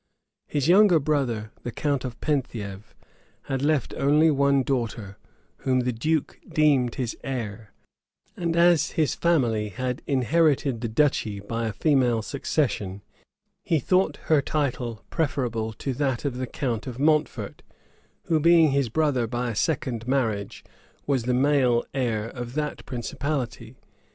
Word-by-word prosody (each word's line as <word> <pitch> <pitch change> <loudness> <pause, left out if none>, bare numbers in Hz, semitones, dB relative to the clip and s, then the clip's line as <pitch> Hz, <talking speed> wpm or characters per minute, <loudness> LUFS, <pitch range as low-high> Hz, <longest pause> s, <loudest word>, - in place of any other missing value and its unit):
His 145 0 -1
younger 190 0 +6
brother, 130 -7 -1
the 120 - -5
count 140 +1 -1
of 120 -3 -6
Penthiev 110 -8 -3 0.5
had 135 -1 -3
left 145 -3 +1
only 150 +3 +4
one 140 -1 +3
daughter, 115 -7 -3 0.4
whom 130 -1 +1
the 125 0 -1
duke 155 +6 -1
deemed 140 -6 +3
his 125 -4 -3
heir; 115 -5 -5 0.6
and 170 -2 -2
as 170 -1 +4
his 155 -3 +1
family 120 -11 +1
had 125 +4 -3
inherited 140 -2 +2
the 120 - -1
duchy 110 -4 +1
by 115 +3 -3
a - - -2
female 125 -4 +2
succession, 105 -7 -2 0.6
he 165 - +1
thought 185 +8 +1
her 155 -3 +3
title 125 -7 -2
preferable 120 -8 -1
to 135 +5 -4
that 135 0 -1
of 130 -3 -2
the 130 0 -3
count 120 -2 -3
of 125 -2 -6
Mountfort, 150 +2 0 0.6
who, 160 -2 +1
being 165 -1 +5
his 135 -3 +1
brother 130 -3 +1
by 120 +1 -2
a - - -6
second 125 -4 -1
marriage, 110 -7 -1 0.4
was 135 -5 0
the 125 0 +1
male 130 -3 +3
heir 115 -5 -1
of 120 0 -7
that 150 -1 -3
principality. 125 -1 -4
130 Hz, 140 wpm, -25 LUFS, 115-150 Hz, 0.6 s, younger